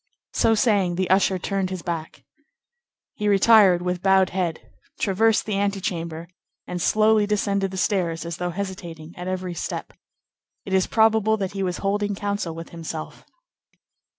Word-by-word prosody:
So 225 Hz, -, +3 dB
saying, 205 Hz, -6 st, +2 dB
the 185 Hz, 0 st, -1 dB
usher 190 Hz, 0 st, +3 dB
turned 195 Hz, +1 st, -2 dB
his 185 Hz, -2 st, -5 dB
back. 165 Hz, -2 st, -5 dB, 0.9 s
He 210 Hz, -, -3 dB
retired 200 Hz, -3 st, +5 dB
with 180 Hz, -1 st, -2 dB
bowed 190 Hz, -1 st, +4 dB
head, 175 Hz, -3 st, -1 dB, 0.4 s
traversed 220 Hz, +2 st, +2 dB
the 205 Hz, -2 st, -1 dB
antechamber, 175 Hz, -5 st, -2 dB, 0.4 s
and 180 Hz, -1 st, -5 dB
slowly 215 Hz, +2 st, +3 dB
descended 200 Hz, -2 st, 0 dB
the 190 Hz, -, -7 dB
stairs, 180 Hz, -4 st, 0 dB
as 170 Hz, -1 st, -5 dB
though 180 Hz, 0 st, -2 dB
hesitating 175 Hz, -4 st, -6 dB
at 180 Hz, +1 st, -7 dB
every 185 Hz, -1 st, -3 dB
step. -, -, -5 dB, 0.7 s
It 190 Hz, -, -5 dB
is 190 Hz, -1 st, +3 dB
probable 220 Hz, -1 st, +3 dB
that 195 Hz, -3 st, -3 dB
he 195 Hz, -, -4 dB
was 180 Hz, -2 st, -1 dB
holding 205 Hz, +1 st, 0 dB
counsel 200 Hz, -4 st, -3 dB
with 165 Hz, 0 st, -8 dB
himself. 160 Hz, -2 st, -7 dB
190 Hz, 150 wpm, -23 LUFS, 175-205 Hz, 0.9 s, retired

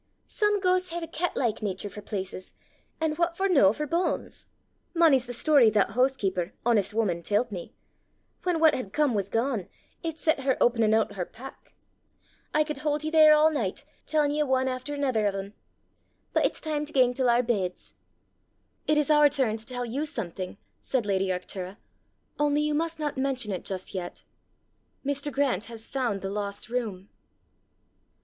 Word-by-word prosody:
Some 420 Hz, -1 st, +1 dB
ghaists 370 Hz, -1 st, +2 dB
hae 340 Hz, 0 st, -4 dB
a -, -, -5 dB
cat 330 Hz, +2 st, -2 dB
like 235 Hz, -5 st, 0 dB
natur 200 Hz, -1 st, -2 dB
for 210 Hz, +1 st, -9 dB
places, 190 Hz, -2 st, -6 dB, 0.4 s
an' 320 Hz, -1 st, +1 dB
what 340 Hz, 0 st, 0 dB
for 390 Hz, -, +2 dB
no 275 Hz, -, +5 dB
for 300 Hz, +7 st, -3 dB
banes? 340 Hz, +4 st, -2 dB, 0.5 s
Mony's 290 Hz, -7 st, +4 dB
the -, -, -5 dB
story 260 Hz, -1 st, +5 dB
that 210 Hz, -2 st, +2 dB
that -, -, -10 dB
hoosekeeper, 205 Hz, -8 st, 0 dB
honest 225 Hz, -5 st, +2 dB
wuman, 205 Hz, -6 st, 0 dB
tellt 210 Hz, +6 st, 0 dB
me: 180 Hz, -4 st, -6 dB, 0.7 s
whan 355 Hz, -2 st, 0 dB
what 320 Hz, -1 st, +6 dB
had 205 Hz, -6 st, -4 dB
come 295 Hz, -4 st, +2 dB
was 200 Hz, -2 st, -1 dB
gane, 230 Hz, -5 st, -1 dB, 0.3 s
it 325 Hz, -2 st, -4 dB
set 315 Hz, -1 st, +1 dB
her 265 Hz, -1 st, +1 dB
openin' 230 Hz, -2 st, +3 dB
oot 220 Hz, -, +2 dB
her 190 Hz, -3 st, -2 dB
pack! 265 Hz, +4 st, -12 dB, 0.8 s
I 305 Hz, -, +3 dB
could 300 Hz, -2 st, -5 dB
haud 300 Hz, 0 st, -1 dB
ye 310 Hz, -, -2 dB
here 310 Hz, -1 st, +7 dB
a' 305 Hz, +1 st, +6 dB
nicht 265 Hz, -2 st, -3 dB, 0.2 s
tellin' 300 Hz, -2 st, +2 dB
ye 300 Hz, +1 st, 0 dB
ane 260 Hz, -2 st, +1 dB
efter 255 Hz, +3 st, -3 dB
anither 255 Hz, -7 st, +1 dB
o' -, -, +2 dB
them. 195 Hz, +1 st, -6 dB, 0.8 s
But -, -, +4 dB
it's -, -, -6 dB
time 305 Hz, -2 st, -2 dB
to 305 Hz, -, -10 dB
gang 250 Hz, -2 st, +4 dB
to 250 Hz, -1 st, +2 dB
oor 240 Hz, +1 st, +3 dB
beds." 195 Hz, -7 st, -2 dB, 0.9 s
"It 305 Hz, -, +3 dB
is 300 Hz, 0 st, +2 dB
our 295 Hz, -1 st, +6 dB
turn 260 Hz, -6 st, +1 dB
to 220 Hz, -, -9 dB
tell 245 Hz, -1 st, -3 dB
you 275 Hz, +7 st, -2 dB
something," 185 Hz, -, -5 dB, 0.2 s
said 255 Hz, -5 st, -1 dB
lady 195 Hz, -1 st, +1 dB
Arctura; 185 Hz, +1 st, -4 dB, 0.3 s
" -, -, -42 dB
only 295 Hz, 0 st, +2 dB
you 300 Hz, 0 st, 0 dB
must 330 Hz, +2 st, -1 dB
not 295 Hz, -3 st, -3 dB
mention 260 Hz, -5 st, 0 dB
it 185 Hz, -, -4 dB
just 190 Hz, 0 st, -4 dB
yet: 180 Hz, -2 st, -6 dB, 0.8 s
Mr. 285 Hz, +1 st, -1 dB
Grant 265 Hz, -8 st, 0 dB
has 225 Hz, -1 st, -8 dB
found 240 Hz, -8 st, -1 dB
the 195 Hz, -, -3 dB
lost 205 Hz, +1 st, -5 dB
room!" 215 Hz, -6 st, -3 dB
255 Hz, 185 wpm, -27 LUFS, 205-300 Hz, 0.9 s, here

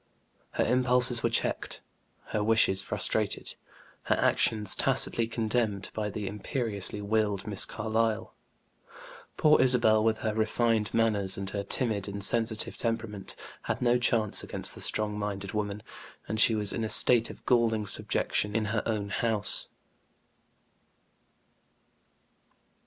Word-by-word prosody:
Her -, -, 0 dB
impulses 125 Hz, -1 st, +4 dB
were 115 Hz, -, 0 dB
checked, 115 Hz, -, -3 dB, 0.5 s
her 105 Hz, -, -2 dB
wishes 110 Hz, -3 st, +2 dB
frustrated, -, -, -1 dB, 0.5 s
her -, -, +1 dB
actions 105 Hz, -3 st, +1 dB
tacitly 115 Hz, -1 st, +2 dB
condemned 110 Hz, -3 st, -2 dB
by 105 Hz, -1 st, -3 dB
the 105 Hz, 0 st, -6 dB
imperiously 105 Hz, -1 st, 0 dB
willed 105 Hz, -2 st, -1 dB
Miss 105 Hz, -3 st, +2 dB
Carlyle. 110 Hz, +1 st, -2 dB, 1.0 s
Poor 155 Hz, 0 st, +4 dB
Isabel, 120 Hz, -4 st, +4 dB
with 110 Hz, 0 st, +1 dB
her 110 Hz, -, 0 dB
refined 110 Hz, 0 st, 0 dB
manners 105 Hz, -4 st, 0 dB
and 95 Hz, 0 st, -5 dB
her 100 Hz, -, -3 dB
timid 105 Hz, -2 st, -2 dB
and 100 Hz, 0 st, -5 dB
sensitive 110 Hz, +1 st, 0 dB
temperament, 115 Hz, -4 st, -2 dB, 0.3 s
had -, -, -3 dB
no 125 Hz, 0 st, +1 dB
chance 115 Hz, -4 st, +1 dB
against -, -, 0 dB
the -, -, -9 dB
strong 105 Hz, -1 st, 0 dB
minded 100 Hz, -1 st, -5 dB
woman, 105 Hz, -1 st, -4 dB, 0.4 s
and 110 Hz, -, -3 dB
she 115 Hz, 0 st, +4 dB
was 105 Hz, -2 st, +1 dB
in 115 Hz, -, -3 dB
a 110 Hz, -, -3 dB
state 120 Hz, 0 st, +5 dB
of -, -, -13 dB
galling 115 Hz, -3 st, +1 dB
subjection 105 Hz, +1 st, -1 dB
in 110 Hz, -1 st, 0 dB
her 110 Hz, -, 0 dB
own 105 Hz, -3 st, -3 dB
house. 110 Hz, -1 st, +1 dB
110 Hz, 130 wpm, -28 LUFS, 105-115 Hz, 1.0 s, state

